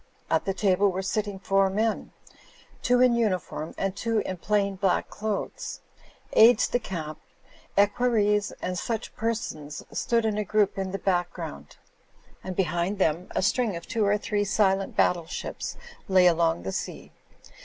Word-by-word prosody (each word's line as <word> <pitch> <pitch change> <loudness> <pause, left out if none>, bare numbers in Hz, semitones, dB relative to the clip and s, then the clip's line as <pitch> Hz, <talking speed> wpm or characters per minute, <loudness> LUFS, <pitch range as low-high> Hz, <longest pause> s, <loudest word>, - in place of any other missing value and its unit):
At - - +2
the 195 - 0
table 195 0 +3
were 190 +1 -3
sitting 205 +1 -2
four 195 0 +2
men, 215 +3 -1 0.7
two 250 0 +3
fti 250 -1 +5
uniform 185 -8 -1
and 195 0 -1
two 230 +1 -1
in 185 - -3
plain 200 +1 0
black 190 -1 0
clothes. 210 -1 -4 0.5
Aides 230 +3 +7
de 245 - 0
camps, 160 -8 -6 0.6
equer 205 +5 +3
ries 210 -3 +2
and 180 -1 -2
such 225 -2 -4
persons 215 -10 -3
stood 230 -1 +1
in 215 -1 0
a - - 0
group 210 0 +2
in 190 -1 -2
the 195 - -3
back 175 -3 0
ground; 70 0 -8 0.7
and 185 -1 -5
behind 175 +2 0
them 170 -1 +1
a - - +1
string 215 +1 +1
of 170 - -7
two 230 -4 0
or 205 +1 +3
three 210 0 -1
silent 195 -1 +1
battle 170 -2 +2
ships - - -5 0.3
lay 185 -1 +5
along 165 - +3
the 95 - -3
sea. - - -5
195 Hz, 165 wpm, -26 LUFS, 180-215 Hz, 0.7 s, Aides